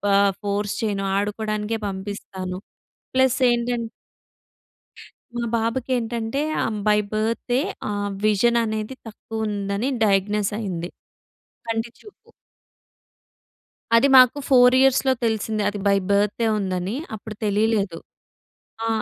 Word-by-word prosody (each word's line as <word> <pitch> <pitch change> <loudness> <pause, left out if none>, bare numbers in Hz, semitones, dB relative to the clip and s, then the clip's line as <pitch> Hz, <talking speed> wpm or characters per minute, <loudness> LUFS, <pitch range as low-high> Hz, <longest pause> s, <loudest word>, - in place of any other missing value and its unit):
ఆహ్, 200 0 +4
ఫోర్స్ 205 0 -1
చేయను 200 -2 -1
ఆడుకోవడానికే 215 +1 -2
పంపిస్తాను. 190 -1 -6 0.6
ప్లస్ 260 -1 +3
ఏంటం 240 0 0 1.5
మా 240 - -1
బాబుకేంటంటే 230 +1 -1 0.2
ఆహ్, 220 -2 -2
బై 210 0 +5
బర్తే 230 +3 0 0.3
ఆ - - -1 0.3
విజన్ 215 +3 +3
అనేది 220 +2 -3
తక్కువ 220 0 -5
ఉందని, 200 +2 -2 0.2
డయాగ్నోస్ 205 0 +1
అయింది. 180 -5 -4 0.8
కంటి 225 +1 -2
చూపు... 420 - -17 1.7
అది 230 +4 +5
మాకు 255 +2 +7
4 250 -2 +7
ఇయర్స్‌లో 265 0 +4
తెలిసింది. 220 -1 -1
అది 205 0 -6
బై 200 0 +4
బర్తే 205 +3 +2
ఉందని 190 +1 -2 0.2
అప్పుడు 215 0 -9
తెలియలేదు. 205 -3 +1 0.9
ఆ! - - -1
215 Hz, 105 wpm, -23 LUFS, 200-235 Hz, 1.7 s, మాకు